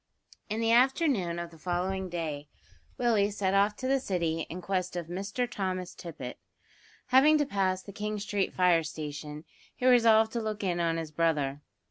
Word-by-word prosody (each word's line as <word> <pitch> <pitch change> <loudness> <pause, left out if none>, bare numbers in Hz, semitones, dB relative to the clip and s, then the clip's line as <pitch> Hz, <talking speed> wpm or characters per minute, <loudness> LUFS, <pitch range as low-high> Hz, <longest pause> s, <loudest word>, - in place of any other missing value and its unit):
A - - -52
HIDDEN - - -50
FIRE. 215 - -7
In 225 - -2
the 225 0 +2
afternoon 245 - +3
of 170 0 -6
the 165 - -16
following 185 +2 -2
day 155 -4 -4 0.5
Willie 220 -5 +2
set 195 -2 -1
off 200 +1 +3
to 255 - -4
the 270 +1 +3
City 170 -8 -1
in 175 - -6
quest 185 -1 -2
of 175 -2 -3
Mr 200 +8 -3
Thomas 185 -4 -3
Tippet. 145 -7 -8 0.7
Having 280 +5 +6
to 295 - +1
pass 190 -6 0
the 200 - -10
King 210 +1 -3
Street 205 -1 -1
fire 180 -2 +4
station, 150 -1 -6 0.3
he 250 - -4
resolved 225 -3 +5
to 235 - -2
look 215 -2 -4
in 175 -2 0
on 165 -1 +1
his 160 -2 -5
brother. 150 -3 0
185 Hz, 190 wpm, -29 LUFS, 170-220 Hz, 0.7 s, Having